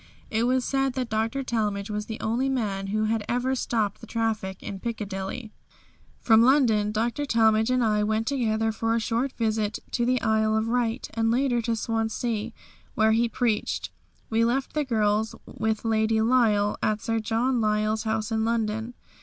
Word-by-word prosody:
It 225 Hz, +2 st, +1 dB
was 255 Hz, -1 st, +1 dB
said 270 Hz, -1 st, 0 dB
that 250 Hz, -2 st, -3 dB
Dr. 225 Hz, +5 st, -1 dB
Talmage 210 Hz, -4 st, -2 dB
was 210 Hz, 0 st, -3 dB
the 220 Hz, -, -6 dB
only 240 Hz, +5 st, 0 dB
man 205 Hz, -7 st, -2 dB
who 215 Hz, +2 st, 0 dB
had 220 Hz, 0 st, 0 dB
ever 250 Hz, +2 st, 0 dB
stopped 220 Hz, -5 st, -1 dB
the -, -, -10 dB
traffic 220 Hz, -5 st, -2 dB
in 195 Hz, -, -6 dB
Piccadilly. 210 Hz, 0 st, -5 dB, 0.7 s
From 225 Hz, -1 st, +5 dB
London 230 Hz, -5 st, +4 dB
Dr. 235 Hz, +6 st, -1 dB
Talmage 220 Hz, -3 st, +3 dB
and 255 Hz, -1 st, +2 dB
I 210 Hz, -2 st, +2 dB
went 220 Hz, +1 st, 0 dB
together 225 Hz, -4 st, 0 dB
for 225 Hz, +1 st, -1 dB
a -, -, +2 dB
short 235 Hz, +4 st, -1 dB
visit 220 Hz, -2 st, -1 dB
to 240 Hz, -, 0 dB
the 250 Hz, +1 st, +2 dB
Isle 220 Hz, 0 st, +2 dB
of 220 Hz, +1 st, 0 dB
Wight, 235 Hz, -1 st, -1 dB
and 225 Hz, 0 st, +1 dB
later 245 Hz, 0 st, +2 dB
to 230 Hz, 0 st, -1 dB
Swansea 225 Hz, 0 st, -2 dB, 0.4 s
where 220 Hz, 0 st, +4 dB
he 230 Hz, +1 st, +2 dB
preached; 230 Hz, -2 st, -1 dB, 0.4 s
we 225 Hz, +1 st, +3 dB
left 255 Hz, +3 st, 0 dB
the 300 Hz, -, +1 dB
girls 220 Hz, -2 st, +1 dB
with 220 Hz, 0 st, -2 dB
Lady 220 Hz, 0 st, +2 dB
Lyle, 220 Hz, -3 st, +3 dB
at 215 Hz, 0 st, +1 dB
Sir 225 Hz, 0 st, 0 dB
John 230 Hz, +3 st, 0 dB
Lyle's 215 Hz, 0 st, +1 dB
house 220 Hz, 0 st, -2 dB
in 220 Hz, 0 st, +1 dB
London. 225 Hz, +1 st, -1 dB
225 Hz, 175 wpm, -26 LUFS, 215-240 Hz, 0.7 s, From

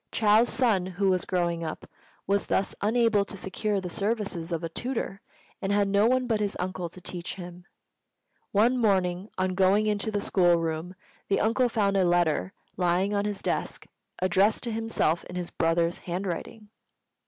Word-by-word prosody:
Chou's 220 Hz, +2 st, +4 dB
son, 220 Hz, -7 st, +2 dB
who 190 Hz, +1 st, 0 dB
was 185 Hz, -1 st, 0 dB
growing 170 Hz, -2 st, -1 dB
up, 160 Hz, -1 st, -6 dB, 0.4 s
was 200 Hz, +1 st, 0 dB
thus 195 Hz, -, 0 dB
unable 225 Hz, -1 st, +3 dB
to 200 Hz, -, -8 dB
secure 200 Hz, +2 st, -2 dB
the 185 Hz, -, -5 dB
services 200 Hz, -5 st, -2 dB
of 165 Hz, 0 st, -2 dB
a -, -, -1 dB
tutor, 225 Hz, 0 st, -4 dB, 0.4 s
and 195 Hz, -, -1 dB
had 200 Hz, 0 st, +3 dB
no 200 Hz, +2 st, +3 dB
one 255 Hz, +1 st, +2 dB
but 225 Hz, -3 st, 0 dB
his 205 Hz, -1 st, -2 dB
uncle 180 Hz, -1 st, -3 dB
to 185 Hz, -, -13 dB
teach 175 Hz, -1 st, -5 dB
him. 175 Hz, -1 st, -10 dB, 0.9 s
One 235 Hz, +5 st, +3 dB
morning, 190 Hz, -3 st, +1 dB
on 185 Hz, 0 st, 0 dB
going 195 Hz, +3 st, +3 dB
into 210 Hz, 0 st, 0 dB
the 205 Hz, -1 st, -1 dB
school 175 Hz, -3 st, +3 dB
room, 165 Hz, +2 st, -3 dB, 0.3 s
the 195 Hz, -, +1 dB
uncle 240 Hz, +3 st, +2 dB
found 200 Hz, -4 st, +1 dB
a 190 Hz, -, +4 dB
letter 175 Hz, 0 st, +2 dB, 0.3 s
lying 180 Hz, +3 st, +1 dB
on 205 Hz, 0 st, 0 dB
his 205 Hz, -2 st, -3 dB
desk -, -, -2 dB, 0.3 s
addressed 190 Hz, +3 st, +2 dB
to 235 Hz, -, -2 dB
himself 225 Hz, -7 st, 0 dB
in 180 Hz, -, -9 dB
his 180 Hz, -1 st, -4 dB
brother's 165 Hz, +1 st, +1 dB
handwriting. 190 Hz, +4 st, -5 dB
195 Hz, 175 wpm, -27 LUFS, 175-210 Hz, 0.9 s, Chou's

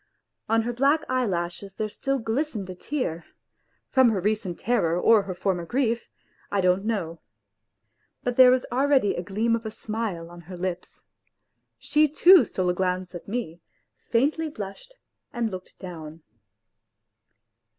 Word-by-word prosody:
On 225 Hz, 0 st, +3 dB
her 240 Hz, +1 st, -2 dB
black 280 Hz, +6 st, +2 dB
eyelashes 195 Hz, -6 st, -2 dB
there 215 Hz, -, -2 dB
still 275 Hz, +6 st, -2 dB
glistened 225 Hz, -2 st, -2 dB
a -, -, -6 dB
tear 180 Hz, -, -3 dB, 0.7 s
from 260 Hz, -2 st, +5 dB
her 210 Hz, -4 st, 0 dB
recent 205 Hz, -2 st, -1 dB
terror 180 Hz, -8 st, +1 dB
or 220 Hz, +3 st, +5 dB
her 190 Hz, -2 st, -6 dB
former 180 Hz, -1 st, -1 dB
grief 235 Hz, +4 st, -1 dB, 0.4 s
I 200 Hz, -, +1 dB
don't 185 Hz, +1 st, +2 dB
know. 175 Hz, -7 st, -2 dB, 1.0 s
But 245 Hz, -1 st, -1 dB
there 255 Hz, 0 st, +8 dB
was 255 Hz, 0 st, +3 dB
already 265 Hz, -4 st, +3 dB
a -, -, -3 dB
gleam 215 Hz, +5 st, 0 dB
of 230 Hz, -, -5 dB
a 220 Hz, -, -4 dB
smile 215 Hz, -6 st, -4 dB
on 175 Hz, 0 st, -11 dB
her 180 Hz, -, -7 dB
lips. 180 Hz, 0 st, -5 dB, 0.7 s
She 305 Hz, +1 st, +3 dB
too 330 Hz, 0 st, +7 dB
stole 185 Hz, -3 st, -1 dB
a -, -, +2 dB
glance 185 Hz, 0 st, -2 dB
at 175 Hz, -, -9 dB
me, 195 Hz, -7 st, -4 dB, 0.5 s
faintly 300 Hz, +7 st, +1 dB
blushed 285 Hz, -, -8 dB, 0.4 s
and 240 Hz, -6 st, -2 dB
looked 185 Hz, -1 st, -9 dB
down. 165 Hz, -4 st, -9 dB
215 Hz, 150 wpm, -25 LUFS, 180-250 Hz, 1.0 s, there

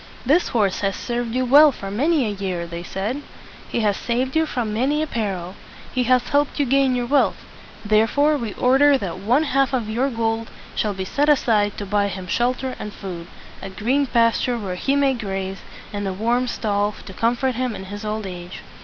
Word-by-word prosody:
"This 310 Hz, +8 st, +3 dB
horse 205 Hz, -5 st, +1 dB
has 195 Hz, -1 st, 0 dB
served 240 Hz, -1 st, -3 dB
you 255 Hz, 0 st, +1 dB
well 290 Hz, +4 st, +7 dB
for 195 Hz, -6 st, -7 dB
many 285 Hz, +6 st, +2 dB
a -, -, -1 dB
year," 190 Hz, -4 st, -3 dB
they 170 Hz, 0 st, -6 dB
said. 205 Hz, +10 st, -3 dB, 0.5 s
"He 235 Hz, -, -1 dB
has 205 Hz, -2 st, +2 dB
saved 250 Hz, +5 st, -2 dB
you 320 Hz, 0 st, +3 dB
from 235 Hz, -7 st, -2 dB
many 280 Hz, +7 st, +1 dB
a -, -, 0 dB
peril. 195 Hz, -, -3 dB, 0.4 s
He 255 Hz, -1 st, +1 dB
has 250 Hz, 0 st, +2 dB
helped 290 Hz, +1 st, +1 dB
you 285 Hz, -, +3 dB
gain 270 Hz, 0 st, +3 dB
your 245 Hz, -1 st, -1 dB
wealth. 280 Hz, +3 st, +1 dB, 0.4 s
Therefore 225 Hz, +8 st, +3 dB
we 230 Hz, -7 st, -3 dB
order 275 Hz, +3 st, +4 dB
that 185 Hz, -7 st, -5 dB
one 240 Hz, +10 st, +2 dB
half 275 Hz, -2 st, +1 dB
of 250 Hz, -3 st, +1 dB
all 215 Hz, -, -8 dB
your 260 Hz, +4 st, +1 dB
gold 225 Hz, -2 st, -1 dB, 0.2 s
shall 210 Hz, -2 st, -1 dB
be 190 Hz, 0 st, -4 dB
set 290 Hz, +9 st, +1 dB
aside 215 Hz, -8 st, +2 dB
to 205 Hz, -, -4 dB
buy 200 Hz, +1 st, +1 dB
him 190 Hz, -2 st, -6 dB
shelter 250 Hz, +6 st, -1 dB
and 210 Hz, -, -5 dB
food, 175 Hz, -4 st, -7 dB, 0.3 s
a 195 Hz, -, -6 dB
green 250 Hz, +9 st, 0 dB
pasture 235 Hz, +1 st, +2 dB
where 200 Hz, -5 st, -4 dB
he 270 Hz, +10 st, 0 dB
may 280 Hz, -1 st, +3 dB
graze, 195 Hz, -4 st, -4 dB, 0.3 s
and 205 Hz, -1 st, -3 dB
a 190 Hz, -, -2 dB
warm 235 Hz, +5 st, 0 dB
stall 205 Hz, -3 st, -1 dB
to 190 Hz, -, -9 dB
comfort 245 Hz, +5 st, +1 dB
him 245 Hz, -2 st, -2 dB
in 190 Hz, -, -7 dB
his 205 Hz, +2 st, -7 dB
old 215 Hz, 0 st, -3 dB
age." 180 Hz, -1 st, -7 dB
230 Hz, 205 wpm, -22 LUFS, 200-260 Hz, 0.5 s, well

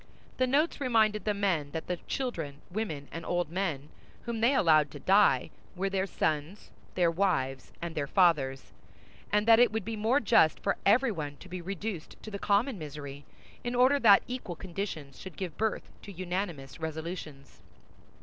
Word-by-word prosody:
The 255 Hz, -, +2 dB
notes 290 Hz, +4 st, +1 dB
reminded 220 Hz, -5 st, +2 dB
the 210 Hz, -, +2 dB
men 180 Hz, -8 st, 0 dB
that 160 Hz, -, -4 dB
the 180 Hz, -, -2 dB
children, 165 Hz, -, -3 dB
women, 165 Hz, -9 st, -4 dB
and 165 Hz, -, -6 dB
old 175 Hz, -3 st, -1 dB
men 165 Hz, -6 st, -2 dB, 0.3 s
whom 235 Hz, -2 st, -4 dB
they 245 Hz, +5 st, +4 dB
allowed 155 Hz, -, +4 dB
to -, -, -10 dB
die 190 Hz, -10 st, +4 dB, 0.2 s
were 195 Hz, +2 st, -1 dB
their 195 Hz, 0 st, 0 dB
sons, 160 Hz, +3 st, -2 dB, 0.2 s
their 175 Hz, -2 st, +3 dB
wives, 160 Hz, -8 st, -1 dB
and 170 Hz, -1 st, -4 dB
their 145 Hz, -3 st, -2 dB
fathers, 140 Hz, -7 st, +2 dB, 0.6 s
and 210 Hz, +1 st, +2 dB
that 225 Hz, 0 st, +7 dB
it 245 Hz, -, +5 dB
would 220 Hz, -3 st, -3 dB
be 225 Hz, 0 st, -3 dB
more 225 Hz, +6 st, +2 dB
just 175 Hz, -, +4 dB
for 195 Hz, -, +1 dB
everyone 200 Hz, -, +2 dB
to 185 Hz, -, -13 dB
be 185 Hz, 0 st, -6 dB
reduced 195 Hz, -1 st, -5 dB
to 215 Hz, -, -8 dB
the 200 Hz, -, -5 dB
common 210 Hz, +3 st, +1 dB
misery, 145 Hz, -2 st, -8 dB, 0.4 s
in 245 Hz, 0 st, -2 dB
order 260 Hz, +3 st, +5 dB
that 210 Hz, -6 st, +7 dB
equal 245 Hz, -8 st, -5 dB
conditions 170 Hz, -6 st, -6 dB
should 190 Hz, -3 st, -10 dB
give 180 Hz, -5 st, -5 dB
birth 220 Hz, 0 st, -2 dB
to 205 Hz, -, -10 dB
unanimous 175 Hz, -6 st, -4 dB
resolutions. 160 Hz, -3 st, -6 dB
185 Hz, 170 wpm, -29 LUFS, 155-215 Hz, 0.6 s, that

